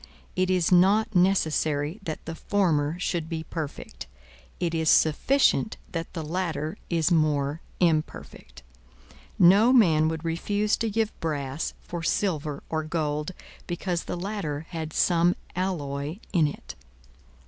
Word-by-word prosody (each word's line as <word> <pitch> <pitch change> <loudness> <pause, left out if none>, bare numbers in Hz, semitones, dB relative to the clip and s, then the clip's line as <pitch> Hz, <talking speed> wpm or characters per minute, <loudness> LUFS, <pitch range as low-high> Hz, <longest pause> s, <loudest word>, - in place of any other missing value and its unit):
It 185 0 +1
is 180 -2 +2
not 200 +5 +4
necessary 160 -3 +1
that 160 -5 -6
the 165 - -5
former 165 -5 0
should 170 -3 -2
be 160 -2 -3
perfect; 155 - -6 0.5
it 170 -2 -1
is 160 -1 +1
sufficient 220 - +3
that 165 -1 -5
the 165 - -4
latter 160 -1 -2
is 165 0 +1
more 150 -1 +1 0.2
imperfect. 155 - -2 0.7
No 200 +7 +6
man 165 -11 +5
would 160 0 -3
refuse 205 +6 0
to 230 - -1
give 220 +1 0
brass 145 -2 -3
for 170 -1 -6
silver 155 -5 -1
or 160 -1 -2
gold, 155 +1 -2 0.3
because 175 0 -2
the - - -4
latter 175 -6 -3
had 160 -3 -5
some 175 +2 +3 0.2
alloy 150 -4 -3 0.2
in 165 -5 +4
it. 145 - -8
165 Hz, 130 wpm, -26 LUFS, 155-185 Hz, 0.7 s, No